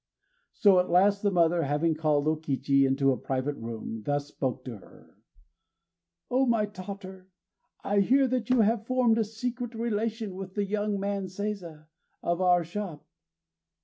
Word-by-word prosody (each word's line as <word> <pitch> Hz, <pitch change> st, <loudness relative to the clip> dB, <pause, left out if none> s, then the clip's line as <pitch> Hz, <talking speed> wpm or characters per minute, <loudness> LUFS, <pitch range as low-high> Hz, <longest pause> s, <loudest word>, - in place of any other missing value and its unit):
_ -, -, -63 dB, 0.5 s
So 195 Hz, -3 st, +5 dB
at 180 Hz, -, 0 dB
last, 200 Hz, +3 st, +4 dB
the 205 Hz, -, +2 dB
mother, 170 Hz, -2 st, +3 dB
having 150 Hz, +3 st, +1 dB
called 155 Hz, -2 st, +1 dB
O 155 Hz, -, +3 dB
Kichi 140 Hz, -2 st, +1 dB
into 135 Hz, +1 st, +2 dB
a 130 Hz, -, 0 dB
private 135 Hz, +2 st, -2 dB
room, 115 Hz, -1 st, -6 dB
thus 145 Hz, +2 st, -2 dB
spoke 130 Hz, -3 st, -3 dB
to 120 Hz, -4 st, -6 dB
her: 95 Hz, -, -19 dB, 1.2 s
"O 260 Hz, +1 st, +3 dB
my 230 Hz, -3 st, +2 dB
daughter, 190 Hz, -1 st, -9 dB, 0.5 s
I 205 Hz, 0 st, +1 dB
hear 265 Hz, +7 st, +4 dB
that 250 Hz, -2 st, -1 dB
you 250 Hz, -2 st, +4 dB
have 220 Hz, +1 st, +1 dB
formed 250 Hz, -3 st, +3 dB
a -, -, +3 dB
secret 240 Hz, +2 st, -5 dB
relation 225 Hz, -2 st, -2 dB
with 190 Hz, 0 st, -8 dB
the 205 Hz, -1 st, 0 dB
young 205 Hz, 0 st, -1 dB
man 200 Hz, 0 st, -2 dB
Seiza, 185 Hz, -5 st, -5 dB, 0.4 s
of 170 Hz, +1 st, 0 dB
our 180 Hz, -1 st, +4 dB
shop. 175 Hz, -2 st, -6 dB
190 Hz, 165 wpm, -28 LUFS, 155-215 Hz, 1.2 s, So